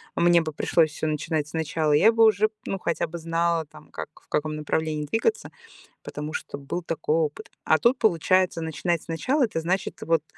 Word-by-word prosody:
мне 175 0 +4
бы 155 -2 -5
пришлось 160 +1 +2
всё 155 +1 -3
начинать 155 0 -1
сначала, 160 -1 -1
я 210 +10 +6
бы 225 0 +4
уже 215 0 +4 0.2
ну 195 - -3
хотя 170 - -1
бы 170 - -7
знала 165 0 0
там, 150 +1 -17
как, - - -6
в - - -31
каком 155 0 -1
направлении 155 0 -2
двигаться, 225 - -1 0.5
потому 150 +1 -6
что - - -5
был 145 +5 -4
такой 160 -1 -1
опыт. 155 -3 -2
А 155 - +4
тут, 245 +8 +2
получается, 185 -3 +2
начинать 160 +1 -2
сначала- 255 - 0
это 210 -8 -3
значит, 180 +4 -2
вот, 165 -2 +1
165 Hz, 185 wpm, -25 LUFS, 155-180 Hz, 0.5 s, я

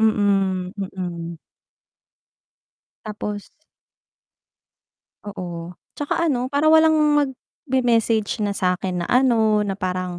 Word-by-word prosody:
mm, 195 -4 +1 0.2
mm. 170 -2 -5 1.7
Tapos 210 -1 -5 1.8
Oo, 175 -4 -6 0.2
tsaka 315 +3 -1
ano 255 -3 0
parang 290 +2 +3
walang 315 0 +5 0.7
magme-message 230 -4 +1
na 205 - 0
sa'kin 180 -1 -1
na - - -6
ano 225 -4 +3
na 195 -1 -3
parang 185 -1 -3
205 Hz, 90 wpm, -22 LUFS, 185-240 Hz, 1.8 s, walang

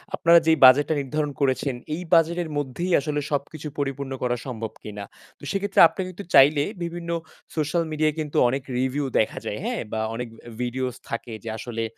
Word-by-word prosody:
আপনারা 170 0 +6
যেই 160 -1 +4
বাজেটটা 145 +5 +6
নির্ধারণ 150 +2 -2
করেছেন, 135 0 +1 0.2
এই 175 - -6
বাজেটের 170 0 +3
মধ্যেই 145 +6 -2
আসলে 150 +1 -2
সবকিছু 150 +2 -3
পরিপূর্ণ 140 -1 -3
করা 120 0 +1
সম্ভব 110 -4 -5
কিনা। 105 -1 -7 0.4
তো - - -22
সেক্ষেত্রে 200 0 0
আপনি 190 - -6
কিন্তু 185 +3 -8
চাইলে 145 +2 +7 0.2
বিভিন্ন 170 0 -5 0.5
সোশ্যাল 160 +2 0
মিডিয়ায় 155 0 +1
কিন্তু 150 -2 -3
অনেক 135 +2 -1 0.2
রিভিউ 130 +2 0
দেখা 110 - 0
যায়, - - -3
হ্যাঁ? - - -2
বা 110 - -2 0.2
অনেক 120 +1 -4 0.3
ভিডিওস 125 0 -2
থাকে 115 0 -5
যে 115 - -5
আসলে 115 -1 -4
145 Hz, 170 wpm, -24 LUFS, 130-160 Hz, 0.5 s, চাইলে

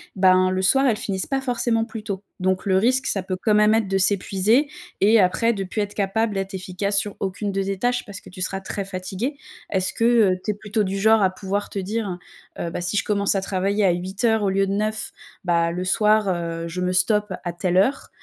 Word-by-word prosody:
ben, 185 -1 +4
le 185 0 -1
soir, 270 +9 +4
elles 235 -5 +2
finissent 195 -4 -2
pas 270 -1 -1
forcément 240 -3 0
plus 225 -1 -7
tôt, 200 -3 -4 0.2
donc 185 +1 -1
le 190 -1 +3
risque, 255 +7 +2
ça 195 - 0
peut 185 0 -3
quand 215 -2 +3
même 210 +1 +5
être 220 -2 +1
de 195 0 0
s'épuiser 200 +7 +2 0.3
et 220 +3 +5
après, 200 +5 +2
de 195 -3 -3
plus 195 +3 -3
être 205 0 -4
capable 210 +2 0
d'être 195 +1 -3
efficace 195 +2 0
sur 205 0 -4
aucune 200 +1 -3
de 195 0 -1
tes 195 0 -3
tâches 245 +2 0
parce 200 -2 -9
que - - -14
tu 185 - -10
seras 195 +1 -2
très 195 +1 -4
fatigué. 195 +8 -4 0.4
Est-ce 190 -1 +1
que, - - -2 0.3
heu, - - -3
tu 215 - +1
es - - -3
plutôt 210 +1 -2
du 195 0 -2
genre 220 +1 +4
à 190 - +3
pouvoir 200 +2 -3
te 200 - -3
dire, 195 -2 -3 0.4
heu: 170 - -2
«Bah, 170 - -5
si 180 +4 -1
je - - +2
commence 200 -1 +1
à 195 - 0
travailler 195 +2 0
à 190 - +4
8:00 195 +5 0
au 200 - +2
lieu 195 +1 +1
de - - -2
9, 215 +2 -1 0.3
bah, 170 -2 +1
le 180 +2 -3
soir, 210 +2 +3
heu, 170 -2 -3
je 175 +2 -5
me 180 0 0
stoppe 210 +2 +2
à 175 - -3
telle 180 +1 -1
heure», 200 +9 +1
195 Hz, 240 wpm, -22 LUFS, 185-215 Hz, 0.4 s, même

